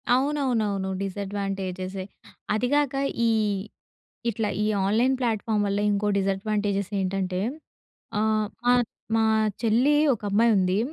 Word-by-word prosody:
అవునవునవును. 245 Hz, -8 st, 0 dB
డిసడ్వాంటేజెసే. 195 Hz, -1 st, -4 dB, 0.5 s
అది 220 Hz, +4 st, +1 dB
కాక, 290 Hz, -2 st, +2 dB, 0.3 s
ఈ -, -, +3 dB, 1.0 s
ఇట్లా 220 Hz, -1 st, -1 dB
ఈ -, -, +1 dB, 0.2 s
ఆన్‍లైన్ 230 Hz, +6 st, +3 dB
ప్లాట్‍ఫామ్ 220 Hz, -3 st, 0 dB
వల్ల 200 Hz, 0 st, 0 dB
ఇంకో 205 Hz, +1 st, 0 dB
డిసాడ్వాంటేజెస్ 200 Hz, 0 st, -1 dB
ఏంటంటే, 185 Hz, -1 st, -1 dB, 0.8 s
ఆహ్, 215 Hz, 0 st, +1 dB, 0.2 s
మా, 245 Hz, -, +6 dB, 0.4 s
మా 225 Hz, -, +3 dB, 0.4 s
చెల్లి 240 Hz, +6 st, +3 dB, 0.2 s
ఒకమ్మాయి 210 Hz, +2 st, +2 dB
ఉంది. 185 Hz, +1 st, +2 dB
205 Hz, 105 wpm, -25 LUFS, 195-225 Hz, 1.0 s, మా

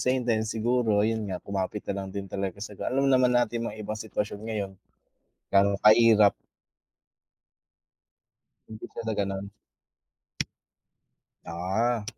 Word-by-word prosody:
same 130 Hz, 0 st, +1 dB
time 115 Hz, -2 st, +2 dB
siguro 110 Hz, -1 st, +1 dB
ayun 110 Hz, -1 st, -1 dB
nga, 95 Hz, -, -2 dB
kumapit 100 Hz, +1 st, -3 dB
na 100 Hz, -, -3 dB
lang 95 Hz, -, -6 dB
din 100 Hz, +1 st, -5 dB
talaga 95 Hz, -1 st, -3 dB
sa -, -, -9 dB
ga 100 Hz, -, -4 dB
alam 135 Hz, +1 st, +2 dB
naman 130 Hz, -1 st, +5 dB
natin 115 Hz, -1 st, 0 dB
mga 105 Hz, -, -8 dB
iba 105 Hz, -, -3 dB
sitwasyon 105 Hz, -1 st, -4 dB
ngayon, 100 Hz, -3 st, -3 dB, 0.8 s
ga'no 100 Hz, 0 st, +4 dB
kahirap. 110 Hz, -2 st, +7 dB, 2.4 s
Hindi 110 Hz, 0 st, -8 dB
pala 115 Hz, -1 st, -3 dB
gano'n. 100 Hz, 0 st, -3 dB, 1.9 s
Ah. 100 Hz, +7 st, -1 dB
110 Hz, 125 wpm, -27 LUFS, 100-115 Hz, 2.4 s, kahirap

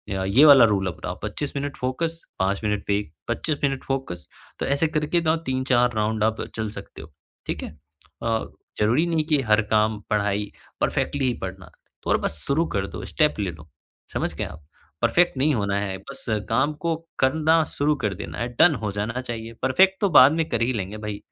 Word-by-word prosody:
अ, 95 Hz, -, -1 dB
ये 115 Hz, +10 st, +6 dB
वाला 140 Hz, -5 st, +9 dB
रूल 100 Hz, -3 st, +1 dB
अपनाओ, 85 Hz, -, -5 dB
25 145 Hz, -1 st, -4 dB
minute 140 Hz, 0 st, -4 dB
focus, 160 Hz, +6 st, -2 dB, 0.2 s
5 100 Hz, +2 st, 0 dB
minute 105 Hz, -1 st, 0 dB
break 100 Hz, -6 st, -1 dB, 0.2 s
25 155 Hz, -2 st, -1 dB
minute 135 Hz, -2 st, 0 dB
focus, 110 Hz, -, -4 dB, 0.3 s
तो -, -, -1 dB
ऐसे 140 Hz, +3 st, +1 dB
करके 155 Hz, +2 st, 0 dB
ना 160 Hz, 0 st, +2 dB
3-4 130 Hz, -2 st, +2 dB
राउंड 110 Hz, 0 st, 0 dB
आप 110 Hz, 0 st, 0 dB
चल 110 Hz, -1 st, -2 dB
सकते 100 Hz, -1 st, -9 dB
हो, 80 Hz, -, -13 dB, 0.4 s
ठीक -, -, -3 dB
है? -, -, -5 dB, 0.5 s
अ, 115 Hz, -1 st, 0 dB, 0.3 s
ज़रूरी 120 Hz, +10 st, +3 dB
नहीं 165 Hz, -2 st, +1 dB
कि 150 Hz, -3 st, +3 dB
हर 105 Hz, +1 st, +5 dB
काम 110 Hz, 0 st, +2 dB
पढ़ाई 105 Hz, -1 st, 0 dB, 0.3 s
परफ़ेक्टली 140 Hz, -2 st, 0 dB
ही 125 Hz, -, +2 dB
पढ़ना 95 Hz, 0 st, -7 dB, 0.4 s
और -, -, +4 dB
बस 75 Hz, -, -1 dB
शुरू 155 Hz, +4 st, +2 dB
कर 95 Hz, -1 st, 0 dB
दो, -, -, -7 dB
स्टेप 150 Hz, -7 st, +1 dB
ले 100 Hz, -3 st, -1 dB
लो, 80 Hz, -1 st, -14 dB, 0.4 s
समझ -, -, -1 dB
गए -, -, -3 dB
आप? 75 Hz, -, -10 dB, 0.4 s
परफ़ेक्ट 175 Hz, -5 st, +3 dB
नहीं 145 Hz, +3 st, +3 dB
होना 100 Hz, -3 st, 0 dB
है 95 Hz, -2 st, -3 dB
बस 135 Hz, +8 st, -8 dB, 0.2 s
काम 145 Hz, +7 st, +2 dB
को 165 Hz, -, +2 dB, 0.2 s
करना 160 Hz, +4 st, +3 dB
शुरू 150 Hz, +1 st, +2 dB
कर 105 Hz, -2 st, +1 dB
देना 80 Hz, -1 st, -7 dB
है, 120 Hz, -, -1 dB
डन 160 Hz, -3 st, +7 dB
हो 105 Hz, -, -1 dB
जाना 110 Hz, +5 st, -3 dB
चाहिए, 115 Hz, -2 st, -6 dB
परफ़ेक्ट 190 Hz, +9 st, +4 dB
तो 200 Hz, -, +3 dB
बाद 140 Hz, -3 st, +8 dB
में 160 Hz, -1 st, 0 dB
कर 115 Hz, -2 st, -1 dB
ही 125 Hz, +2 st, +1 dB
लेंगे 100 Hz, 0 st, -4 dB
भई, 105 Hz, -1 st, -5 dB
120 Hz, 200 wpm, -24 LUFS, 105-145 Hz, 0.5 s, वाला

